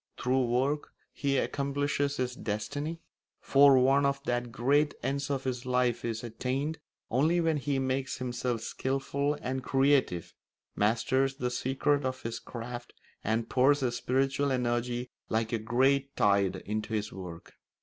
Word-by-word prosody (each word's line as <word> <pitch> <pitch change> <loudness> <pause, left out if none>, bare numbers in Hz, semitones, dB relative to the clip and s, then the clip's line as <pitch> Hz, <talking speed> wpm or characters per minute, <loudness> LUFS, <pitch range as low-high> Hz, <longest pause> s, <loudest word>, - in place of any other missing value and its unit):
Through 130 +1 +1
work 130 +5 0 0.2
he 140 -1 0
accomplishes 145 +1 0
his 125 -1 -1
destiny; 145 +11 -3 0.4
for 140 -1 +6
one 135 +2 +4
of 140 0 +1
the 120 0 0
great 135 +5 +1
ends 140 +1 -1
of 135 -2 -1
his 125 -2 -2
life 125 -2 +1
is 115 -1 -3
attained 130 +7 -2 0.3
only 155 +8 +3
when 165 -2 +2
he 140 0 -1
makes 130 0 -1
himself 125 -2 -2
skilful 135 +4 -1
and 130 +1 -2
creative, 135 - +2 0.4
masters 130 +5 +2
the 125 -3 -2
secrets 140 +3 +1
of 130 0 -3
his 115 0 -4
craft 120 0 -7 0.3
and 110 +1 0
pours 140 +3 +3
his 120 -2 0
spiritual 135 +3 +1
energy 120 0 -1 0.2
like 110 +1 0
a 115 - +1
great 135 +5 +2
tide 100 -2 +3
into 110 +2 -3
his 105 0 -2
work. 90 -3 -9
130 Hz, 145 wpm, -30 LUFS, 120-140 Hz, 0.4 s, for